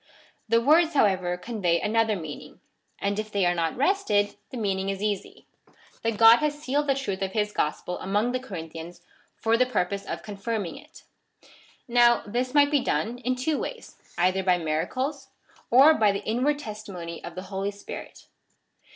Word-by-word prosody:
The 230 Hz, +1 st, +5 dB
words, 315 Hz, +5 st, +4 dB
however, 185 Hz, -7 st, +2 dB
convey 180 Hz, -4 st, 0 dB
another 220 Hz, 0 st, +1 dB
meaning, 160 Hz, -5 st, -8 dB, 0.4 s
and 200 Hz, +1 st, -1 dB
if 215 Hz, 0 st, -5 dB
they 200 Hz, -3 st, +1 dB
are 175 Hz, -, +3 dB
not 165 Hz, +1 st, -1 dB
wrested, 270 Hz, -, +1 dB
the 255 Hz, -, -7 dB
meaning 195 Hz, -3 st, -1 dB
is 195 Hz, +1 st, -3 dB
easy 205 Hz, -2 st, -3 dB, 0.3 s
— -, -, -28 dB
that 225 Hz, -2 st, -1 dB
God 225 Hz, +1 st, +8 dB
has 300 Hz, +1 st, -1 dB
sealed 290 Hz, 0 st, -1 dB
the 275 Hz, -, +3 dB
truth 200 Hz, -9 st, -3 dB
of 190 Hz, 0 st, -2 dB
his 210 Hz, -1 st, 0 dB
gosjDel 155 Hz, +4 st, -2 dB
among 205 Hz, +5 st, 0 dB
the 255 Hz, -, -1 dB
Corinthians, 170 Hz, -6 st, -8 dB, 0.3 s
for 225 Hz, +1 st, +1 dB
the 255 Hz, +1 st, +3 dB
purpose 200 Hz, -4 st, -1 dB
of -, -, -5 dB
confirming 205 Hz, -1 st, -4 dB
it. 300 Hz, +3 st, -15 dB, 0.8 s
Now, 240 Hz, -1 st, +4 dB
this 250 Hz, +5 st, -2 dB
might 285 Hz, 0 st, +5 dB
be 290 Hz, -, +4 dB
done 240 Hz, +1 st, -1 dB
in 255 Hz, 0 st, -1 dB
two 280 Hz, +4 st, -1 dB
ways, -, -, -7 dB, 0.2 s
either 185 Hz, +2 st, +2 dB
by 180 Hz, -1 st, +3 dB
miracles, 255 Hz, -, -2 dB, 0.4 s
or 275 Hz, +6 st, +7 dB
by 215 Hz, -8 st, +3 dB
the 200 Hz, -, -4 dB
inward 255 Hz, +7 st, +1 dB
testimony 205 Hz, -, -7 dB
of 170 Hz, -, -8 dB
the 185 Hz, -, -6 dB
Holy 195 Hz, +1 st, -1 dB
Spirit. 200 Hz, 0 st, -9 dB
215 Hz, 175 wpm, -26 LUFS, 190-255 Hz, 0.8 s, God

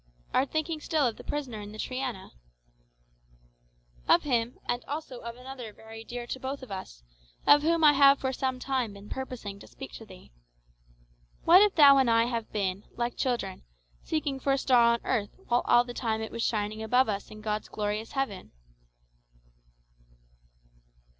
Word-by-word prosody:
'" -, -, -31 dB
"Art 265 Hz, +1 st, +2 dB
thinking 315 Hz, 0 st, -2 dB
still 305 Hz, -3 st, +1 dB
of 235 Hz, -3 st, -1 dB
the -, -, -10 dB
prisoner 260 Hz, -7 st, -4 dB
in 205 Hz, 0 st, -9 dB
the -, -, -9 dB
Triana?" 255 Hz, -4 st, -4 dB, 1.8 s
"Of -, -, +5 dB
him, 240 Hz, -3 st, 0 dB
and 245 Hz, 0 st, -1 dB
also 285 Hz, -4 st, -6 dB
of 235 Hz, 0 st, -7 dB
another 250 Hz, -2 st, -8 dB
very 225 Hz, +1 st, -11 dB
dear 240 Hz, +1 st, -6 dB
to 260 Hz, -, -5 dB
both 265 Hz, +1 st, -5 dB
of 255 Hz, -, -10 dB
us, -, -, -7 dB, 0.4 s
of 290 Hz, -, +7 dB
whom 330 Hz, +1 st, +2 dB
I 295 Hz, -1 st, +8 dB
have 275 Hz, 0 st, +6 dB
for 265 Hz, 0 st, -2 dB
some 260 Hz, 0 st, -1 dB
time 255 Hz, -4 st, -2 dB
been 200 Hz, +1 st, -12 dB
purposing 240 Hz, -7 st, -6 dB
to -, -, -13 dB
speak 270 Hz, -, -10 dB
to 225 Hz, -, -10 dB
thee. 185 Hz, -, -15 dB, 1.1 s
What 355 Hz, +3 st, +8 dB
if 420 Hz, -1 st, +4 dB
thou 280 Hz, -3 st, +8 dB
and 260 Hz, -3 st, +3 dB
I 230 Hz, 0 st, +5 dB
have 235 Hz, -2 st, -3 dB
been, 195 Hz, -1 st, -2 dB
like 240 Hz, 0 st, -2 dB
children, 240 Hz, -7 st, -2 dB, 0.4 s
seeking 290 Hz, -4 st, -2 dB
for 275 Hz, +1 st, +1 dB
a -, -, +2 dB
star 255 Hz, -3 st, +4 dB
on 235 Hz, -, -2 dB
earth 215 Hz, -5 st, -1 dB
while 240 Hz, 0 st, +3 dB
all 240 Hz, -, +5 dB
the 245 Hz, 0 st, -8 dB
time 225 Hz, -3 st, -1 dB
it 220 Hz, 0 st, -5 dB
was 230 Hz, -, -4 dB
shining 215 Hz, -1 st, -1 dB
above 250 Hz, +4 st, +3 dB
us 205 Hz, -2 st, -3 dB
in 215 Hz, 0 st, -11 dB
God's 215 Hz, 0 st, -3 dB
glorious 210 Hz, +1 st, -3 dB
heaven?" 220 Hz, -, -3 dB
245 Hz, 180 wpm, -28 LUFS, 215-270 Hz, 1.8 s, I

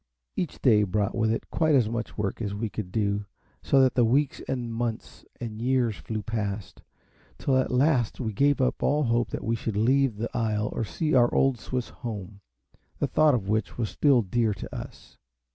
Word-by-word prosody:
Each 175 Hz, -, -3 dB
day 110 Hz, -6 st, +5 dB
brought 105 Hz, 0 st, 0 dB
with 110 Hz, -1 st, +1 dB
it 115 Hz, -, -3 dB
quite 160 Hz, -2 st, +3 dB
as 125 Hz, -5 st, +4 dB
much 115 Hz, +1 st, -4 dB
work 105 Hz, +1 st, -2 dB
as 100 Hz, -2 st, -2 dB
we 110 Hz, +1 st, -2 dB
could 100 Hz, -5 st, -5 dB
do, 100 Hz, -1 st, 0 dB, 0.4 s
so 135 Hz, -1 st, +4 dB
that 125 Hz, -1 st, +2 dB
weeks 135 Hz, +5 st, +1 dB
and 120 Hz, -3 st, -3 dB
months 115 Hz, 0 st, -4 dB
and 110 Hz, -2 st, -6 dB
years 125 Hz, -3 st, +1 dB
flew 105 Hz, +8 st, -5 dB
past, 100 Hz, -5 st, -4 dB, 0.6 s
till 135 Hz, -, +1 dB
at 130 Hz, -, +2 dB
last 125 Hz, -3 st, +2 dB
we 110 Hz, -4 st, -2 dB
gave 140 Hz, +6 st, +3 dB
up 130 Hz, -, 0 dB
all 150 Hz, +1 st, +2 dB
hope 120 Hz, -1 st, +1 dB
that -, -, -5 dB
we 115 Hz, -, 0 dB
should 110 Hz, -2 st, -3 dB
leave 130 Hz, +2 st, +3 dB
the 115 Hz, +2 st, -4 dB
isle 110 Hz, -2 st, 0 dB
or -, -, -2 dB
see 155 Hz, +8 st, -2 dB
our 120 Hz, -2 st, +5 dB
old 135 Hz, -3 st, +2 dB
Swiss 125 Hz, +1 st, -3 dB
home, 105 Hz, -4 st, -7 dB, 0.6 s
the -, -, 0 dB
thought 155 Hz, -3 st, +4 dB
of 100 Hz, -6 st, -3 dB
which 110 Hz, 0 st, -1 dB
was 115 Hz, -4 st, -2 dB
still 135 Hz, -5 st, +3 dB
dear 110 Hz, +2 st, 0 dB
to -, -, -8 dB
us. -, -, -10 dB
115 Hz, 195 wpm, -27 LUFS, 105-130 Hz, 0.6 s, day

